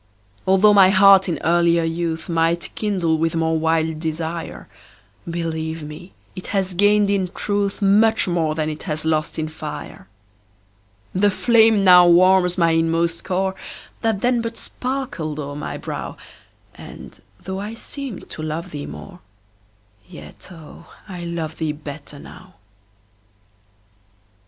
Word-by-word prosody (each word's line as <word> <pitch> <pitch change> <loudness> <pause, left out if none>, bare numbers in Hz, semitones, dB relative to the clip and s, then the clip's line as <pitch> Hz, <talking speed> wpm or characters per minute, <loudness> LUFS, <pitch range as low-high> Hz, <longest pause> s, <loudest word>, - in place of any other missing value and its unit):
Altho' 195 +2 +5
my 195 -2 +7
heart 195 0 +6
in 170 - -1
earlier 170 0 +3
youth 165 0 -3
Might 165 0 0
kindle 180 -7 0
with 165 +1 0
more 160 0 +1
wild 160 0 0
desire, 160 +1 -5 0.6
Believe 160 -1 -4
me, 150 +5 -10 0.2
it 185 - -8
has 195 -2 -1
gained 205 +2 +3
in 195 -2 0
truth 200 0 -2
Much 215 +3 +3
more 165 -3 0
than 155 -1 -1
it 155 0 -5
has 155 +1 -3
lost 155 -1 -1
in 155 -1 -2
fire. 155 -1 -8 1.1
The 205 +3 +3
flame 220 0 +4
now 180 -2 +8
warms 180 +1 +4
my 170 -2 +3
inmost 165 +1 0
core, 190 +1 -1 0.5
That 220 -3 0
then 245 -1 +2
but 230 0 -5
sparkled 250 - -5
o'er 145 -1 -5
my 150 - -5
brow, - - -6 0.6
And, - - -12 0.2
though 190 +1 -6
I 210 +3 -6
seemed 265 -2 -7
to - - -7
love 160 +3 -5
thee 145 -1 -6
more, 185 -2 -10 0.9
Yet, 75 0 -13
oh, 165 -4 -14 0.2
I 180 -3 -7
love 165 -2 -5
thee 155 -2 -1
better 145 -1 -10
now. 185 +5 -14
170 Hz, 135 wpm, -21 LUFS, 160-195 Hz, 1.1 s, now